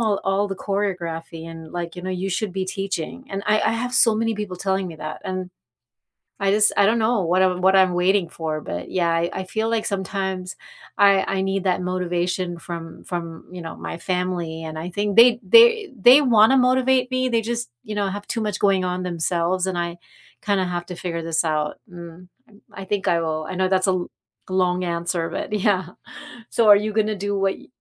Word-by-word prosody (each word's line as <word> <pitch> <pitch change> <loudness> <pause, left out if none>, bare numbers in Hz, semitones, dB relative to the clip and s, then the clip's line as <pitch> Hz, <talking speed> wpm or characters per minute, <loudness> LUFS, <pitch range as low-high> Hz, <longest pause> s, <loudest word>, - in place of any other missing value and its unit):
all 215 -3 +1
all 195 +1 +1
the 195 - -3
choreography 170 -6 -3
and 165 -1 -11
like, 175 0 -5
you 180 - -7
know, 185 - -4
you 185 +1 -3
should 190 +1 -2
be 190 0 -2
teaching," 195 +5 -4
and 195 0 -4
I 215 0 +3
I - - +1
have 245 +2 -3
so 225 -3 +5
many 225 +1 0
people 205 -3 -5
telling 190 +1 -1
me 170 - -7
that, 155 0 -7
and 185 -1 -4 0.9
I 195 -1 +2
just 210 +1 +4
I 200 - +5
don't 225 +3 +2
know 220 -3 +1
what 180 +3 +2
I'm 185 -1 +2
what 190 +1 +4
I'm 185 -2 +5
waiting 180 0 +2
for, 155 -2 -4
but 90 -9 -6
yeah, 175 -2 +1
I 165 +1 +1
I 190 - -3
feel 220 +4 -2
like 225 -1 0
sometimes 190 -2 -3 0.4
I 200 -1 +5
I 195 -1 -1
need 195 0 -1
that 180 0 +1
motivation 180 0 -2
from 165 -1 -8
from, 170 -2 -6
you 180 - -8
know, 165 -1 -7
my - - -6
family, 175 -2 -3
and 155 0 -6
I 170 - -5
think 205 +3 -2
they 235 0 +7
they 460 -3 +6
they 250 +8 +8
wanna 235 -2 +5
motivate 255 0 +3
me; 255 0 +1
they 230 -1 +1
just, 235 +1 -3
you 215 - -6
know, 205 -1 0
have 205 +1 -6
too 230 - -2
much 210 -2 -2
going 195 -2 +2
on 180 0 -2
themselves, 175 +1 -1
and 185 -2 -2
I 170 0 -3 0.4
kinda 200 -2 +1
have 175 -1 -3
to 180 - -6
figure 170 -1 -4
this 165 0 0
out, 150 -1 -1
mm, 175 0 -11 0.2
and 205 -2 -21
I 195 - -7
think 205 +1 -2
I 170 -1 +2
will. 155 -1 -2
I - - -5
know 185 0 +1
that's 185 0 +2
a - - +4
l 180 - -1 0.5
g - - -5
long 180 -1 +1
answer, 170 -1 -2
but - - -5
yeah. 195 -3 +1 0.6
So, 230 - +2
are - - +10
you 215 0 -3
gonna 215 -1 +1
do 205 -1 0
what 195 0 0
y - - -17
185 Hz, 220 wpm, -22 LUFS, 175-210 Hz, 0.9 s, are